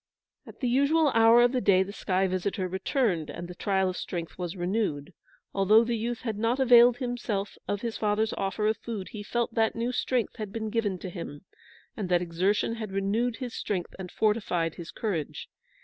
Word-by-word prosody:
At - - -13
the 255 - +1
usual 280 +5 +3
hour 230 0 +6
of 245 - +4
the 255 -1 0
day 190 -3 +4
the 200 +1 -8
sky 190 -2 0
visitor 185 +1 -2
returned, 190 - 0
and 175 - -6
the 180 - -8
trial 190 +1 0
of 185 - -2
strength 170 -2 -5
was 180 0 -5
renewed. 175 -6 -2 0.4
Although 205 +3 +5
the 235 0 -1
youth 230 +1 -3
had 220 -4 -3
not 230 +4 +1
availed 245 -2 +7
himself 235 -6 -3
of 205 0 -2
his 230 -2 -3
father's 215 +1 +1
offer 195 +2 -2
of 215 0 +2
food, 215 -5 -6
he 210 - -7
felt 235 +2 -2
that 225 -1 +1
new 235 +2 -1
strength 250 -2 -1
had 215 -3 -5
been 220 0 -4
given 205 -5 0
to 185 - -7
him, 165 -3 -8 0.5
and 200 -5 -4
that 175 -1 +4
exertion 195 +6 0
had 215 -3 -5
renewed 210 +5 0
his 250 -2 -6
strength 185 -4 -3
and 180 -2 -7
fortified 205 -7 0
his 170 -1 -9
courage. 185 -9 -3
210 Hz, 195 wpm, -28 LUFS, 185-235 Hz, 0.5 s, availed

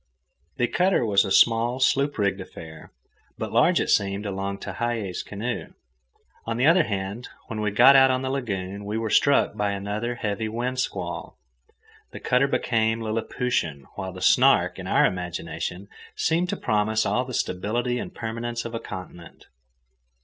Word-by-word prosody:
The 120 - +2
cutter 180 -1 +2
was 100 -2 +4
a 95 - -4
small, 120 +4 +4
sloop 140 +2 +2
rigged 100 -2 0
affair, 80 -4 -11 0.5
but - - -5
large - - +4
it - - 0
seemed 100 +1 +1
alongside 100 0 -4
Tehei's 115 -6 -2
canoe. 110 +4 -5 0.7
On 115 0 -2
the 125 - +2
other 165 +2 +5
hand, 100 +4 -4 0.2
when 110 -1 -4
we 105 - +1
got 120 +7 +7
out 135 0 +7
on 130 0 0
the 130 - -2
lagoon 100 -9 -3
and 100 0 -7
were 110 +1 -2
struck 140 0 +3
by 100 -1 0
another 105 +4 -3
heavy 110 -1 -3
wind 125 +3 -3
squall, 90 -8 -4 0.7
the - - -9
cutter 125 +2 +2
became 115 -4 +1
liliputian, 110 - -2
while 95 -1 -5
the 90 0 -10
Snark, - - +4
in - - -6
our - - +4
imagination, 90 +1 -4 0.3
seemed 170 +2 +1
to - - -2
promise 110 +1 +1
all 125 - +1
the 130 -1 -6
stability 120 +7 -1
and - - -7
permanence 115 +1 -4
of 115 - -6
a 115 - -2
continent. 90 -5 -10
110 Hz, 165 wpm, -25 LUFS, 100-120 Hz, 0.7 s, got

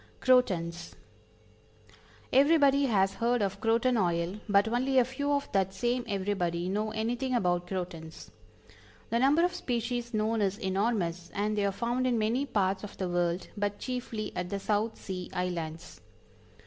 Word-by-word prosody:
CROTONS. 175 -10 +1 1.4
Everybody 280 0 +5
has 195 -4 +2
heard 235 +1 +1
of 195 -1 -3
croton 230 +2 +2
oil, 175 0 0
but 200 +1 +4
only 255 +4 +1
a 250 - +6
few 285 +3 -2
of 285 0 0
that 190 -1 +1
same 240 +5 0
everybody 185 -4 -1
know 210 +3 -1
anything 240 +4 -1
about 175 -5 +1
Crotons. 175 -4 -6 0.8
The 235 - +2
number 290 +7 +4
of 360 - -1
species 240 0 -2
known 220 0 0
is 200 0 0
enormous, 190 -4 -1
and 210 +1 0
they 205 -1 +1
are - - 0
found 240 +5 -1
in 245 -2 +2
many 230 +6 0
parts 195 -4 0
of 205 - -8
the 185 -2 -2
world, 175 0 -1
but 205 -1 -2
chiefly 235 -4 -4
at 180 0 -3
the 200 - -2
South 215 +3 -1
Sea 185 -2 -6
Islands. 170 -2 -4
210 Hz, 155 wpm, -29 LUFS, 185-245 Hz, 1.4 s, a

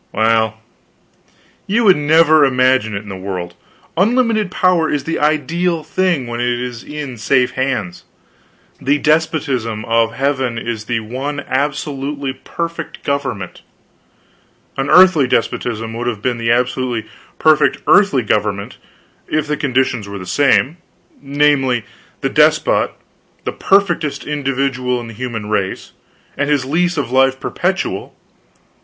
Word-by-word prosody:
Well, 110 0 +2 1.1
you 230 +4 +2
would 190 -4 +6
never 155 +1 +4
imagine 130 -5 +2
it 100 - -4
in 105 - -11
the 95 - -5
world. 95 -2 -5 0.4
Unlimited 220 +1 +2
power 180 -3 +2
is 145 -2 -1
the 165 - -2
ideal 165 +2 0
thing 170 -3 0
when 120 0 -5
it 120 0 0
is 125 -1 -5
in 145 -4 -6
safe 125 +3 +2
hands. 105 -10 -2 0.8
The 140 +2 +2
despotism 145 -8 0
of 115 0 +1
heaven 130 -3 -1
is 115 -2 -4
the 115 -1 -1
one 135 +6 -4
absolutely 140 0 -2
perfect 165 +5 -6
government. 135 -10 -3 1.1
An 135 +1 -2
earthly 180 -7 +6
despotism 115 -1 -1
would 120 -2 -3
be 125 +4 0
the 115 -1 -1
absolutely 125 -1 0 0.3
perfect 150 -3 +3
earthly 200 - +4
government, 105 -1 -1 0.5
if 155 -1 0
the 150 0 -1
conditions 130 -6 0
were 100 - -6
the 90 - -8
same, 140 - +2 0.4
namely, 140 -4 +1 0.4
the - - 0
despot - - +3 0.5
the - - -2
perfectest 175 -6 +1
individual 135 -3 -1
of 120 - -7
the - - -9
human 115 -2 -5
race, 100 -3 -2 0.4
and 145 +1 -1
his 145 -3 +1
lease 175 +5 0
of 130 -4 -2
life 130 0 +3
perpetual. - - -2
135 Hz, 130 wpm, -17 LUFS, 115-150 Hz, 1.1 s, would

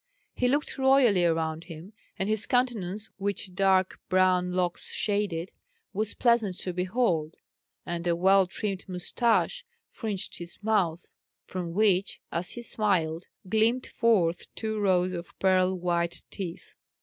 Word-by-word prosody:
He 250 - +1
looked 285 +2 0
royally 265 -8 +5
around 160 0 0
him; 170 +4 -10 0.2
and 190 - -1
his 215 0 0
countenance, 220 -5 0
which 200 -1 -2
dark 190 -1 +2
brown 185 -1 +3
locks 180 -1 -1
shaded, 200 -4 -1 0.4
was 210 +1 -2
pleasant 230 -6 +2
to 180 - -2
behold; 180 -4 0 0.5
and 175 0 -3
a 170 - +3
well 190 +2 +4
trimmed 195 0 -4
moustache 235 - +1 0.3
fringed 210 -5 -3
his 175 0 -8
mouth, 185 -6 0 0.3
from 175 -2 -5
which, 200 -2 +2
as 170 +1 -2
he 240 - -6
smiled, 185 -8 0 0.2
gleamed 225 +5 +2
forth 185 -8 +1
two 220 -1 -3
rows 185 -2 +2
of 175 0 -7
pearl 185 -1 +3
white 170 -1 -1
teeth. 180 -4 -7
185 Hz, 135 wpm, -28 LUFS, 175-215 Hz, 0.5 s, royally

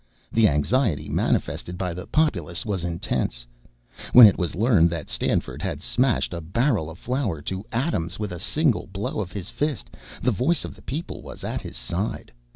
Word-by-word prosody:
The 115 -1 +5
anxiety 75 - +1
manifested 90 +1 -1
by 90 -2 -2
the 90 +1 -7
populace 90 - 0
was 100 -5 -2
intense. 85 -8 -2 0.7
When 125 -2 +12
it 100 - +7
was 90 -3 -2
learned 100 -5 +4
that 85 0 -5
Stanford - - -1
had - - -3
smashed 125 -6 +1
a 85 - -4
barrel 100 - +1
of 80 - -10
flour 125 - -2
to 95 +4 -3
atoms 110 - -1
with 105 -3 -3
a 90 - -6
single 150 - +1
blow 100 +3 -4
of 95 -4 -3
his 100 -2 -6
fist, 150 -3 -2 0.3
the 125 - +2
voice 140 - +1
of - - -7
the - - -17
people 155 +6 -5
was - - -10
at - - -3
his - - -8
side. 85 - -3
100 Hz, 180 wpm, -24 LUFS, 85-125 Hz, 0.7 s, When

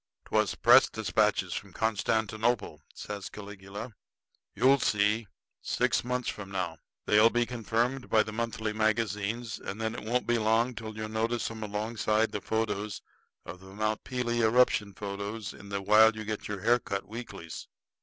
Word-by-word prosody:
'" - - -54
"'Twas - - +1
press - - +6
despatches - - +1
from - - -6
Constantinople," 110 -3 0
says 100 -2 -6
Caligula. 100 +2 -8 0.6
"You'll 135 +3 +5
see, 105 +1 +2 0.3
six - - +1
months 125 0 -2
from 100 -2 -5
now. 90 -4 -3 0.3
They'll 105 +2 +6
be 120 0 +1
confirmed 120 +2 -1
by 110 -1 +5
the 110 - -7
monthly 110 -1 -2
magazines; 110 +1 -1
and 95 +3 -6
then 110 0 -1
it - - -7
won't 120 +3 0
be 120 -1 +2
long 115 +3 +2
till 110 -1 -7
you'll 110 0 -3
notice 115 +2 -1
'em 110 -1 -8
alongside 110 +1 0
the 105 - -3
photos 105 0 -2 0.4
of 90 - -8
the 95 +1 -13
Mount 110 0 -1
Pelee 120 -2 -1
eruption 110 -3 +3
photos 100 +2 -5
in 100 -1 -12
the 100 -1 -3
while 110 +2 +6
you 110 0 -6
get 110 0 -4
your 105 -2 -4
hair 120 +3 +4
cut 100 -3 -4
weeklies. 110 -7 -8
110 Hz, 165 wpm, -29 LUFS, 105-115 Hz, 0.6 s, press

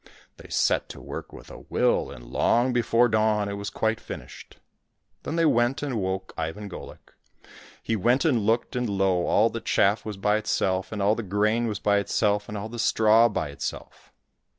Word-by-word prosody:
They - - -14
set - - +1
to - - -9
work - - -8
with - - -12
a - - -10
will, - - 0
and - - -11
long 120 - +1
before 120 0 +3
dawn 110 -2 +1
it 100 - -4
was 100 0 -4
quite 110 0 -1
finished. - - -10 0.6
Then 155 - -4
they 165 0 +2
went 120 0 +2
and 140 -3 -2
awoke 95 -3 -3
Ivan 80 +6 -4
Golik. 95 - -11 0.7
He 115 - -1
went 120 - +2
and 135 -7 +3
looked, 115 +5 0
and 125 -2 -1
lo! 95 -3 +1
all 110 +2 +3
the 115 - -5
chaff 100 +3 +2
was 105 -2 -6
by 105 +2 +2
itself, 95 -3 -1
and 105 -2 -2
all 105 +2 +4
the 115 - -3
grain 105 +4 0
was 105 -3 -2
by 100 +1 +2
itself, 105 0 0
and 105 - -5
all 100 +2 -5
the 120 +1 -8
straw 110 +1 +4
by 80 -8 -3
itself 70 - -7
105 Hz, 195 wpm, -25 LUFS, 100-115 Hz, 0.7 s, all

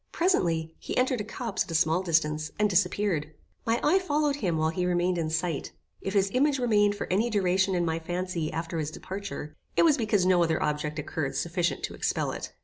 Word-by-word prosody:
Presently, 165 - +1
he - - -5
entered 255 -2 +2
a - - -3
copse 225 0 -3
at - - -15
a 165 - -3
small 160 +2 +3
distance, 155 -3 +1
and 210 - +3
disappeared. 180 -5 0 0.3
My 230 +1 +2
eye 350 +6 +4
followed 295 -5 0
him 180 - 0
while 160 0 +1
he 180 +2 -2
remained 175 0 +1
in 160 -1 -1
sight. 165 -2 -2 0.3
If 195 - -4
his 195 0 +3
image 275 +4 +2
remained 210 -5 +3
for - - -4
any 220 +5 +2
duration 190 -2 +2
in 175 -1 +1
my 165 0 -1
fancy 175 -1 -3
after 165 +1 -3
his 150 -1 -2
departure, 185 -3 -7 0.2
it - - +5
was 305 -3 +5
because 210 -6 +1
no 185 -1 +4
other 160 -1 +1
object 150 0 -1
occurred 150 -1 -3
sufficient 175 +1 -1
to - - -3
expel - - -1
it. - - -6
180 Hz, 210 wpm, -28 LUFS, 160-210 Hz, 0.3 s, it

